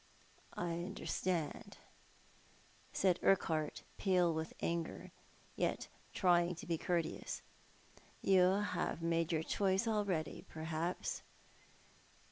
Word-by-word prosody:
" - - -28
I 175 -1 -2
understand," 180 -3 -2 1.1
said 185 -2 +3
Urquhart, 160 -5 +2 0.2
pale 180 -3 +3
with 160 0 -3
anger, 170 -1 -2 0.4
yet - - -1 0.2
trying 175 -1 +3
to 170 - -8
be 165 -2 -1
courteous. 170 -2 -1 0.4
" - - -28 0.3
You 190 +1 +5
have 165 - -1
made 165 0 +1
your 160 -1 +1
choice 195 +4 +1
already, 200 -8 0
per 160 - -7
haps 165 +2 -2
175 Hz, 105 wpm, -37 LUFS, 165-185 Hz, 1.1 s, You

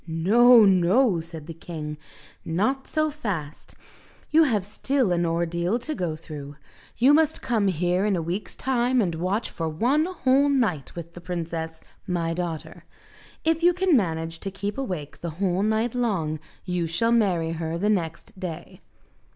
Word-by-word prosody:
"No, 220 +8 +6
no," 190 +2 +4
said 160 -2 -9
the 165 - -7
king, 155 -2 -6 0.5
"not 215 +12 -1
so 310 -1 0
fast. 185 - -5 0.6
You 320 - +6
have 215 -8 0
still 250 +2 0
an 175 -1 +1
ordeal 170 +4 0
to 275 +6 -4
go 175 - -2
through. 145 -3 -9 0.4
You 260 +5 +5
must 315 0 +2
come 220 -4 +1
here 180 +1 +1
in 205 - +2
a 170 - -1
week's 175 +6 -4
time 255 -1 +1
and 185 -7 +1
watch 185 +7 -2
for 165 -3 -3
one 250 - +2
whole 285 -6 +2
night 220 - 0
with 170 -1 -8
the 175 - -10
princess, 165 -2 -4 0.3
my 170 -2 -1
daughter. 165 -2 -5 0.6
If 325 0 +1
you 350 +1 +4
can 365 -3 +3
manage 165 -6 -1
to 195 - -3
keep 200 +1 -4
awake 180 - -5
the 170 - -3
whole 190 -1 +1
night 220 +2 +1
long 190 -11 -1 0.3
you 180 -2 -1
shall 230 +8 +1
marry 185 -8 +2
her 165 0 -3
next 180 -3 -2
day." 175 -4 -7
185 Hz, 160 wpm, -25 LUFS, 165-240 Hz, 0.6 s, No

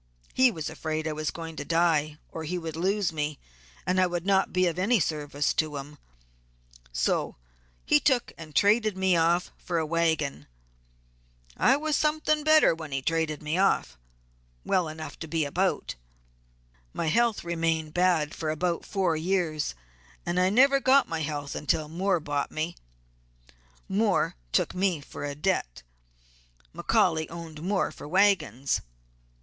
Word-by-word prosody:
He 260 0 +5
was 160 -9 -5
afraid 155 0 -3
I - - -1
was 155 0 -2
going 165 -1 -7
to - - -3
die, 160 -3 +1
or 160 - -6
he 175 +4 -3
would 165 -2 -5
lose 190 +1 0
me, 150 -1 -2 0.5
and 185 +1 +2
I 185 - +4
would 175 0 -3
not 195 -1 +2
be 185 0 +2
of 175 0 -1
any 220 +5 +3
service 145 -3 -1
to 155 -2 -1
him, 145 +1 -9 0.9
so - - 0 0.5
he 150 - +5
took 255 - +1
and 155 -3 -11
traded 210 +3 +3
me 190 -1 +3
off 170 +2 +2
for 175 - -3
a 160 - 0
wagon. 155 - 0 1.1
I 265 - +4
was 305 0 -1
something 305 0 +1
better 310 - +6
when 160 -2 -8
he 135 -1 -2
traded 160 -1 -1
me 155 +4 -1
off; 195 - +2 0.7
well 180 -3 +1
enough 155 0 -8
to 160 - -6
be 160 -1 0
about. 185 +7 -1 1.0
My - - -2
health 230 +7 +2
remained 165 -2 -1
bad 175 -4 +2
for 155 - -3
about 170 +2 -1
four 185 -5 +1
years, 160 - -1 0.5
and 175 +1 0
I 185 +1 +4
never 275 +6 +5
got 270 +1 +4
my 165 - -3
health 145 -2 -4
until 155 +1 -1
Moore 180 +3 0
bought 145 -2 -2
me. 160 +2 -3 1.1
Moore 200 - +1 0.2
took - - +1
me 185 -3 +1
for 145 - -9
a 145 -1 -4
debt. 150 - -1 0.9
McCaully 160 -1 +1
owed 165 -2 -8
Moore 190 +3 0
for - - -10
wagons. 155 - +2
165 Hz, 155 wpm, -27 LUFS, 155-190 Hz, 1.1 s, better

